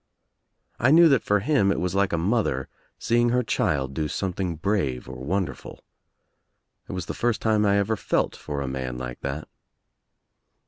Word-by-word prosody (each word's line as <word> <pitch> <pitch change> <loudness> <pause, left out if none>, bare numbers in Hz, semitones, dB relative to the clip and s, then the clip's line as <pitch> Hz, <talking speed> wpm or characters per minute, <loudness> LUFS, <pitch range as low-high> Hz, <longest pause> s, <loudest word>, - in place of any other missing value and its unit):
I 120 - +4
knew 165 +3 +8
that 135 -5 +4
for 105 0 +1
him 115 -7 +2
it - - -1
was 90 0 -1
like 100 0 +2
a 85 - 0
mother 85 - 0 0.3
seeing 120 +1 +2
her 125 +1 +2
child 70 - 0
do 75 +1 -1
something 90 +1 -2
brave 80 -9 -1
or 65 0 -8
wonder 90 -1 -1
ful. - - -13 1.1
It - - -5
was 90 -2 -4
the - - -4
first 120 -2 0
time 105 -1 +2
I 100 0 +3
ever 100 +2 +1
felt - - 0
for 75 -2 -5
a 70 - -3
man 65 -2 -4
like 60 -1 -6
that. 70 +3 -4
95 Hz, 180 wpm, -25 LUFS, 70-110 Hz, 1.1 s, knew